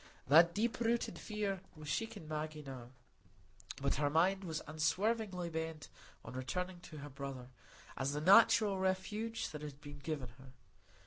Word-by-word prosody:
That 165 Hz, +4 st, +7 dB
deep 225 Hz, +3 st, 0 dB
rooted 235 Hz, 0 st, 0 dB
fear 205 Hz, -3 st, -2 dB
was 155 Hz, -1 st, -10 dB
shaking 225 Hz, -1 st, -3 dB
Maggie 155 Hz, 0 st, -4 dB
now; 130 Hz, -3 st, -8 dB, 0.9 s
but 140 Hz, 0 st, 0 dB
her 145 Hz, 0 st, +2 dB
mind 185 Hz, +6 st, +3 dB
was 160 Hz, -4 st, -3 dB
unswervingly 180 Hz, +3 st, 0 dB
bent 160 Hz, -1 st, -4 dB, 0.4 s
on 115 Hz, -, -7 dB
returning 175 Hz, +8 st, -3 dB
to 165 Hz, -3 st, -11 dB
her 145 Hz, 0 st, -7 dB
brother, 135 Hz, -2 st, -6 dB, 0.5 s
as 135 Hz, +2 st, -1 dB
the 150 Hz, -, -1 dB
natural 200 Hz, +2 st, +6 dB
refuge 205 Hz, +4 st, -1 dB
that 150 Hz, -, -6 dB
had 145 Hz, -2 st, -7 dB
been 145 Hz, -1 st, -10 dB
given 140 Hz, -4 st, -4 dB
her. 130 Hz, -1 st, -14 dB
160 Hz, 150 wpm, -36 LUFS, 145-195 Hz, 0.9 s, That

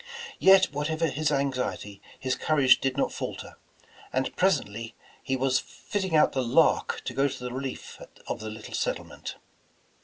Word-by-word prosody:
Yet 190 Hz, -4 st, +6 dB
whatever 155 Hz, +3 st, -1 dB
his 155 Hz, +1 st, 0 dB
anxiety, 130 Hz, -7 st, -2 dB, 0.2 s
his 130 Hz, -1 st, -1 dB
courage 140 Hz, -4 st, +4 dB
did 135 Hz, 0 st, -1 dB
not -, -, 0 dB
falter, -, -, -6 dB, 0.5 s
and 130 Hz, 0 st, -1 dB
presently 115 Hz, -, 0 dB, 0.3 s
he 135 Hz, -, -1 dB
was 130 Hz, 0 st, +2 dB
fitting 190 Hz, -6 st, -3 dB
out 150 Hz, -, +5 dB
the 130 Hz, -, 0 dB
Lark 120 Hz, -2 st, +2 dB
to -, -, -3 dB
go 140 Hz, +1 st, +2 dB
to 130 Hz, -2 st, -6 dB
the 125 Hz, 0 st, -4 dB
relief 130 Hz, 0 st, -6 dB, 0.2 s
of -, -, -4 dB
the 110 Hz, -, -5 dB
little 110 Hz, 0 st, -9 dB
settlement. -, -, -3 dB
135 Hz, 155 wpm, -27 LUFS, 125-150 Hz, 0.5 s, Yet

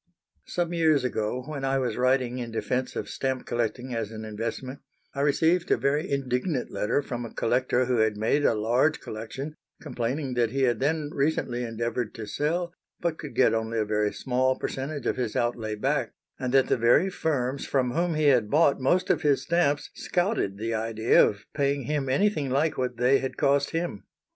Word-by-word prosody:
Some 175 Hz, -1 st, -1 dB
years 160 Hz, -5 st, +3 dB
ago, 125 Hz, 0 st, -2 dB
when 145 Hz, -2 st, -5 dB
I 135 Hz, 0 st, +1 dB
was 125 Hz, -4 st, -1 dB
writing 125 Hz, 0 st, +1 dB
in 120 Hz, -1 st, -4 dB
defence 125 Hz, +3 st, -2 dB
of -, -, -3 dB
stamp 130 Hz, -1 st, -2 dB
collecting 120 Hz, +2 st, -2 dB
as 115 Hz, -3 st, -2 dB
an 110 Hz, 0 st, -7 dB
investment, 115 Hz, +5 st, -5 dB, 0.3 s
I 140 Hz, -, -2 dB
received 165 Hz, +5 st, +2 dB
a -, -, +4 dB
very 145 Hz, +3 st, 0 dB
indignant 135 Hz, +1 st, -1 dB
letter 140 Hz, +7 st, 0 dB
from 120 Hz, -2 st, -4 dB
a 115 Hz, -, -7 dB
collector 125 Hz, +1 st, +1 dB
who 125 Hz, -1 st, +1 dB
had 110 Hz, -1 st, +2 dB
made 115 Hz, +7 st, +1 dB
a 115 Hz, -, +3 dB
large 120 Hz, +8 st, +2 dB
collection, 115 Hz, +7 st, -6 dB, 0.3 s
complaining 130 Hz, +3 st, -3 dB
that 120 Hz, -2 st, +2 dB
he 135 Hz, +3 st, -1 dB
had 120 Hz, -3 st, +2 dB
then 150 Hz, +1 st, 0 dB
recently 135 Hz, -4 st, 0 dB
endeavoured 115 Hz, 0 st, -3 dB
to 115 Hz, -3 st, -6 dB
sell, 170 Hz, +9 st, -1 dB, 0.3 s
but 170 Hz, -2 st, -2 dB
could 150 Hz, -, -8 dB
get -, -, +4 dB
only 110 Hz, 0 st, -1 dB
a 110 Hz, -, +1 dB
very 105 Hz, 0 st, 0 dB
small 130 Hz, 0 st, 0 dB
percentage 140 Hz, 0 st, -4 dB
of -, -, 0 dB
his 120 Hz, -4 st, -2 dB
outlay 115 Hz, -2 st, -1 dB
back, 130 Hz, +2 st, -1 dB, 0.3 s
and 130 Hz, -2 st, -2 dB
that 135 Hz, 0 st, +5 dB
the -, -, +1 dB
very 120 Hz, +11 st, +4 dB
firms 135 Hz, -6 st, -1 dB
from 130 Hz, -3 st, +1 dB
whom 170 Hz, +3 st, 0 dB
he 155 Hz, -, 0 dB
had 125 Hz, -7 st, +4 dB
bought 145 Hz, -1 st, +3 dB
most 175 Hz, +8 st, +2 dB
of -, -, +1 dB
his 145 Hz, -2 st, +2 dB
stamps 170 Hz, -5 st, +1 dB
scouted 175 Hz, -, -1 dB
the 115 Hz, +2 st, -2 dB
idea 110 Hz, +1 st, +3 dB
of 100 Hz, 0 st, -1 dB
paying 140 Hz, -1 st, 0 dB
him 140 Hz, +1 st, -1 dB
anything 150 Hz, -1 st, +1 dB
like 145 Hz, +4 st, +1 dB
what 125 Hz, -2 st, -2 dB
they 125 Hz, +3 st, +4 dB
had 130 Hz, -, -4 dB
cost 140 Hz, 0 st, +2 dB
him. 165 Hz, -, -3 dB
130 Hz, 190 wpm, -27 LUFS, 115-145 Hz, 0.3 s, that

